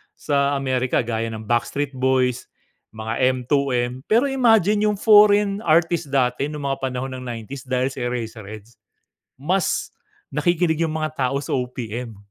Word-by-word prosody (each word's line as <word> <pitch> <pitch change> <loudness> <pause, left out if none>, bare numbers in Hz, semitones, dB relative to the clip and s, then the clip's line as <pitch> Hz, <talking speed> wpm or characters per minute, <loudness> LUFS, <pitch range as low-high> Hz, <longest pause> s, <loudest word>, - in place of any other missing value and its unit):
sa 140 -1 0
America 130 -2 0
gaya 115 -1 -2
ng 110 0 -7
Backstreet 120 +5 -1
Boys, 130 -1 +1 0.5
mga 110 +1 -4 0.2
M2M 125 -1 -1
pero 235 +6 +3
imagine 215 -5 +3
yung 210 - +1
foreign 205 -1 +5
artist 165 0 +2
dati 125 0 +1
nung 150 -1 -6
mga 135 0 -1
panahon 130 +1 -4
ng - - -9
90's 120 +3 -7
dahil 130 0 0
sa 130 - -8
Eraserheads, 110 -2 -6 0.6
mas 180 +5 0 0.4
nakikinig 160 +2 +1
yung 160 -1 0
mga 155 0 -2 0.2
tao 140 +2 -1
sa - - -5
OPM. 125 -3 -4
135 Hz, 140 wpm, -22 LUFS, 125-165 Hz, 0.6 s, foreign